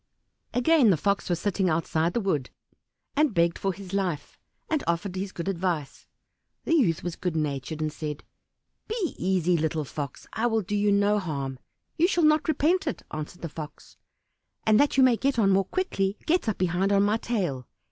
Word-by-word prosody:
Again 255 Hz, 0 st, +5 dB
the 180 Hz, -, +4 dB
Fox 200 Hz, +5 st, 0 dB
was 175 Hz, -1 st, 0 dB
sitting 195 Hz, -2 st, 0 dB
outside 160 Hz, +1 st, 0 dB
the -, -, +3 dB
wood, 160 Hz, -, -1 dB, 0.7 s
and 295 Hz, -5 st, +2 dB
begged 170 Hz, 0 st, +2 dB
for 195 Hz, -, 0 dB
his 190 Hz, 0 st, -10 dB
life, 180 Hz, -7 st, -2 dB, 0.3 s
and 310 Hz, -3 st, 0 dB
offered 170 Hz, +3 st, -1 dB
his 190 Hz, +1 st, -3 dB
good 170 Hz, 0 st, -6 dB
advice. 175 Hz, -6 st, -2 dB, 0.6 s
The -, -, 0 dB
youth 210 Hz, -, +3 dB
was 175 Hz, -1 st, -3 dB
good 180 Hz, -3 st, -3 dB
natured, 150 Hz, 0 st, -2 dB
and 155 Hz, -1 st, -1 dB
said, 150 Hz, -2 st, -5 dB, 0.6 s
"Be 435 Hz, -6 st, -2 dB
easy, 180 Hz, -1 st, +2 dB
little 155 Hz, -1 st, -1 dB
Fox, 140 Hz, -1 st, -6 dB
I 230 Hz, +2 st, +1 dB
will 225 Hz, -2 st, +1 dB
do 205 Hz, +3 st, -3 dB
you 205 Hz, 0 st, +2 dB
no 205 Hz, +1 st, +3 dB
harm." 140 Hz, -7 st, -4 dB, 0.4 s
"You 340 Hz, -, +5 dB
shall 345 Hz, -4 st, +2 dB
not 305 Hz, +1 st, +3 dB
repent 325 Hz, +5 st, +2 dB
it," -, -, -3 dB
answered 155 Hz, +3 st, -6 dB
the -, -, -1 dB
Fox; 155 Hz, -1 st, -9 dB, 0.7 s
"and 220 Hz, 0 st, +5 dB
that 285 Hz, -1 st, +3 dB
you 265 Hz, -, +7 dB
may 250 Hz, -3 st, +5 dB
get 275 Hz, +1 st, 0 dB
on 200 Hz, -4 st, +4 dB
more 195 Hz, 0 st, +3 dB
quickly, 200 Hz, -, -1 dB
get 335 Hz, -7 st, +2 dB
up 215 Hz, -, -2 dB
behind 185 Hz, +2 st, +1 dB
on 200 Hz, 0 st, +4 dB
my 210 Hz, +2 st, +2 dB
tail." 180 Hz, -, -2 dB
195 Hz, 190 wpm, -26 LUFS, 165-225 Hz, 0.7 s, you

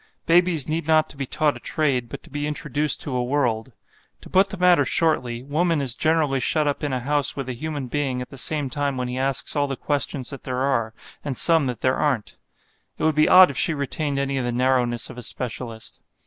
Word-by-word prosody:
Babies 170 Hz, -4 st, +3 dB
need 160 Hz, 0 st, -2 dB
not 155 Hz, -1 st, +3 dB
to -, -, -9 dB
be 135 Hz, -1 st, -5 dB
taught 150 Hz, 0 st, +1 dB
a -, -, -9 dB
trade, 135 Hz, -6 st, -1 dB
but -, -, -8 dB
to -, -, -16 dB
be 145 Hz, +1 st, -3 dB
introduced 150 Hz, 0 st, +2 dB
to 135 Hz, -, -4 dB
a 125 Hz, -, 0 dB
world. 125 Hz, -3 st, -1 dB, 0.5 s
To -, -, -14 dB
put 190 Hz, +1 st, +4 dB
the 195 Hz, -, -5 dB
matter 180 Hz, -1 st, +4 dB
shortly, 125 Hz, -7 st, 0 dB
woman 160 Hz, +3 st, 0 dB
is 135 Hz, -4 st, 0 dB
generally 155 Hz, -1 st, +1 dB
shut 150 Hz, +3 st, +1 dB
up 145 Hz, -, -2 dB
in 145 Hz, -, -1 dB
a 130 Hz, -1 st, -2 dB
house 145 Hz, +1 st, 0 dB
with 135 Hz, -2 st, -5 dB
a 130 Hz, -, -3 dB
human 145 Hz, +2 st, -5 dB
being 130 Hz, 0 st, -2 dB
at 125 Hz, -, -6 dB
the 145 Hz, +2 st, -2 dB
time 140 Hz, -2 st, -2 dB
when 125 Hz, 0 st, -2 dB
he 125 Hz, +1 st, -4 dB
asks 135 Hz, +3 st, -1 dB
all 145 Hz, -1 st, +1 dB
the 135 Hz, -, -3 dB
questions 140 Hz, -1 st, -1 dB
that 140 Hz, -, -8 dB
there 130 Hz, 0 st, -3 dB
are, 115 Hz, -5 st, 0 dB, 0.3 s
and 135 Hz, -4 st, -3 dB
some 165 Hz, -5 st, +4 dB
that 125 Hz, -3 st, -5 dB
there 130 Hz, 0 st, +1 dB
aren't. 130 Hz, -8 st, -1 dB, 0.6 s
It -, -, -5 dB
would 160 Hz, -, +3 dB
be 155 Hz, +1 st, +3 dB
odd 185 Hz, -4 st, +8 dB
if -, -, -3 dB
she 160 Hz, -, +2 dB
retained 140 Hz, +1 st, -2 dB
any 140 Hz, 0 st, -1 dB
of -, -, -2 dB
the 120 Hz, -, -1 dB
narrowness 125 Hz, -1 st, 0 dB
of 125 Hz, -, -10 dB
a -, -, -6 dB
specialist. 115 Hz, -2 st, -4 dB
140 Hz, 230 wpm, -23 LUFS, 125-155 Hz, 0.6 s, odd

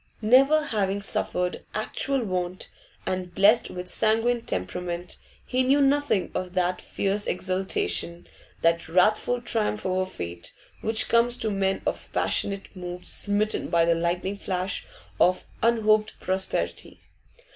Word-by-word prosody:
Never 275 Hz, +7 st, +5 dB
having 200 Hz, -5 st, -1 dB
suffered 180 Hz, -2 st, -1 dB
actual 260 Hz, +4 st, 0 dB
want, 185 Hz, -2 st, -3 dB, 0.3 s
and 185 Hz, -1 st, -3 dB
blessed 210 Hz, +4 st, +5 dB
with 180 Hz, 0 st, -7 dB
sanguine 225 Hz, +5 st, +1 dB
temperament, 175 Hz, -, -4 dB, 0.3 s
he 255 Hz, 0 st, 0 dB
knew 265 Hz, +3 st, +3 dB
nothing 280 Hz, -7 st, +2 dB
of 185 Hz, 0 st, -4 dB
that 180 Hz, 0 st, 0 dB
fierce 200 Hz, +1 st, -2 dB
exultation, 175 Hz, -, -1 dB, 0.4 s
that 165 Hz, 0 st, +2 dB
wrathful 215 Hz, +7 st, +2 dB
triumph 215 Hz, -2 st, 0 dB
over 185 Hz, 0 st, 0 dB
fate, 85 Hz, -, -7 dB, 0.3 s
which 220 Hz, 0 st, +2 dB
comes 235 Hz, +1 st, +3 dB
to 220 Hz, -3 st, -1 dB
men 195 Hz, -1 st, 0 dB
of -, -, -3 dB
passionate 200 Hz, 0 st, -1 dB
mood 180 Hz, -1 st, -7 dB
smitten 205 Hz, +1 st, +1 dB
by 170 Hz, -1 st, +3 dB
the 170 Hz, -, +4 dB
lightning 175 Hz, +4 st, -1 dB
flash 185 Hz, -1 st, -3 dB, 0.3 s
of 185 Hz, +1 st, +3 dB, 0.2 s
unhoped 215 Hz, -2 st, +2 dB
prosperity. 190 Hz, 0 st, -2 dB
195 Hz, 125 wpm, -26 LUFS, 180-220 Hz, 0.4 s, Never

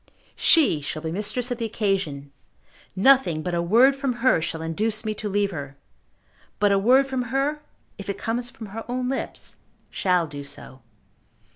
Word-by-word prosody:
She 285 Hz, -, +4 dB
shall 155 Hz, +2 st, -5 dB
be 160 Hz, -, -3 dB
mistress 215 Hz, +7 st, -2 dB
of 245 Hz, -, -2 dB
the 230 Hz, -, -1 dB
occasion. 195 Hz, -11 st, -2 dB, 0.6 s
Nothing 195 Hz, -, +4 dB
but 180 Hz, -, -3 dB
a 170 Hz, -, +1 dB
word 235 Hz, +10 st, +5 dB
from 275 Hz, -2 st, -1 dB
her 240 Hz, -7 st, +2 dB
shall 160 Hz, 0 st, -4 dB
induce 215 Hz, +7 st, -1 dB
me 215 Hz, -, -1 dB
to 210 Hz, 0 st, -5 dB
leave 200 Hz, 0 st, +1 dB
her; 140 Hz, -5 st, -7 dB, 0.8 s
but 205 Hz, -1 st, +3 dB
a 195 Hz, -, +4 dB
word 255 Hz, +7 st, +5 dB
from 265 Hz, -1 st, -2 dB
her, 275 Hz, +5 st, -1 dB, 0.4 s
if 200 Hz, -, -7 dB
it 200 Hz, -, -2 dB
comes 240 Hz, +2 st, -2 dB
from 220 Hz, -3 st, -10 dB
her 225 Hz, +1 st, -5 dB
own 250 Hz, 0 st, -1 dB
lips, 270 Hz, -, -5 dB, 0.3 s
shall 180 Hz, -3 st, +1 dB
do 145 Hz, -2 st, -8 dB
so." 140 Hz, -2 st, -9 dB
210 Hz, 175 wpm, -24 LUFS, 165-250 Hz, 0.8 s, word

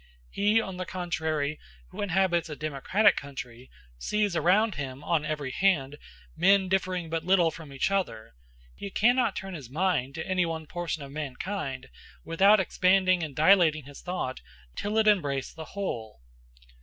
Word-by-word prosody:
He, 210 Hz, +3 st, +3 dB
on 190 Hz, -4 st, -5 dB
the 185 Hz, -, -4 dB
contrary, 160 Hz, -4 st, -2 dB, 0.3 s
who -, -, -7 dB
inhabits 185 Hz, -3 st, +1 dB
a 150 Hz, -, -5 dB
democratic 155 Hz, +8 st, +2 dB
country, 130 Hz, -3 st, -8 dB, 0.3 s
sees 210 Hz, -, 0 dB
around 195 Hz, +7 st, +3 dB
him, 135 Hz, -2 st, -6 dB
one 160 Hz, +1 st, +1 dB
very 150 Hz, -3 st, -3 dB
hand, 145 Hz, -5 st, +1 dB, 0.4 s
men 190 Hz, +3 st, +4 dB
differing 185 Hz, -2 st, 0 dB
but 165 Hz, 0 st, -1 dB
little 175 Hz, -2 st, +3 dB
from 160 Hz, -2 st, -11 dB
each 135 Hz, +7 st, -1 dB
other; 185 Hz, -, -2 dB, 0.4 s
he 200 Hz, -, -7 dB
cannot 240 Hz, +2 st, +2 dB
turn 195 Hz, 0 st, -6 dB
his 140 Hz, -8 st, -8 dB
mind 145 Hz, -4 st, 0 dB
to 160 Hz, -, -4 dB
any 185 Hz, -1 st, +1 dB
one 165 Hz, -2 st, -3 dB
portion 170 Hz, -2 st, -4 dB
of 135 Hz, -, -10 dB
mankind, 140 Hz, -1 st, -5 dB, 0.4 s
without 195 Hz, +6 st, +5 dB
expanding 185 Hz, -1 st, +3 dB
and 150 Hz, -4 st, -5 dB
dilating 160 Hz, -2 st, +4 dB
his 145 Hz, 0 st, -12 dB
thought 180 Hz, -8 st, -4 dB, 0.3 s
till 210 Hz, +2 st, -2 dB
it 220 Hz, -, +4 dB
embrace 145 Hz, -11 st, +1 dB
the 160 Hz, -1 st, -8 dB
whole. 110 Hz, -, -4 dB
170 Hz, 155 wpm, -28 LUFS, 145-190 Hz, 0.4 s, without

